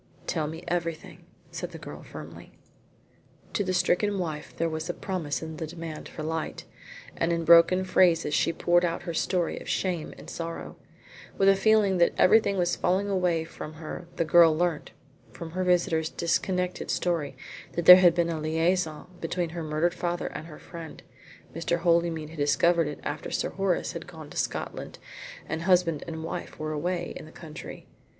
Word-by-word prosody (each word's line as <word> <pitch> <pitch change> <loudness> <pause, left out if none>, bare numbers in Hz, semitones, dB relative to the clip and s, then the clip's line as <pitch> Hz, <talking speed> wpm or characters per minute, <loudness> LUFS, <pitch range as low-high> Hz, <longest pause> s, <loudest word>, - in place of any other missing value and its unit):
"Tell 155 -3 -1
me 160 +3 -7
everything," 170 -2 -4 0.3
said - - -6
the - - -6
girl - - -9
firmly. - - -11 1.0
To 205 - +1
the 185 - -1
stricken 195 +2 +2
wife 155 -5 -4
there 165 - +1
was 160 +1 -4
a 175 - -2
promise 170 -7 -3
in 160 -1 -6
the 160 - -4
demand 165 -1 -7
for 155 - -7
light, 160 0 -3 0.5
and 165 - 0
in 165 -1 -1
broken 170 +3 +7
phrases 175 -4 +3
she - - +2
poured 175 +1 +2
out 170 -1 -1
her 170 -1 -4
story 175 +1 0
of - - -9
shame 175 -4 -1
and - - -12
sorrow. 165 0 -6 0.6
With 195 0 +5
a 195 - +6
feeling 200 -2 +3
that 170 - +4
everything 200 0 +5
was 175 -1 +1
falling 190 +3 +1
away 180 -4 +1
from 160 -1 -8
her 160 +2 -7
the 165 - 0
girl 165 -1 +6
learnt 175 -3 0 0.4
from 165 -1 -8
her 185 +2 -2
visitor's 170 -3 +2
disconnected 180 +1 -1
story 160 -7 -1 0.4
that 170 - -2
there 180 - +12
had 175 -2 +5
been 170 -1 +1
a 160 - -3
liaison 160 +1 0 0.2
between 170 +1 -2
her 170 +1 -5
murdered 155 +2 0
father 175 -1 -2
and 155 - -7
her 155 - -10
friend. 165 -2 -10 0.5
Mr. 165 +1 -1
Holymead 170 -2 +1
had 165 - -10
discovered 165 +3 +3
it 150 - -6
after - - -4
Sir - - -1
Horace 195 -2 0
had - - -7
gone - - -11
to - - -9
Scotland - - -3 0.5
and 160 - -3
husband 175 -4 +2
and 160 -1 -5
wife 165 - -6
were 155 0 -3
away 175 +3 -2
in - - -8
the - - -13
country. 155 -2 -10
170 Hz, 180 wpm, -27 LUFS, 160-180 Hz, 1.0 s, there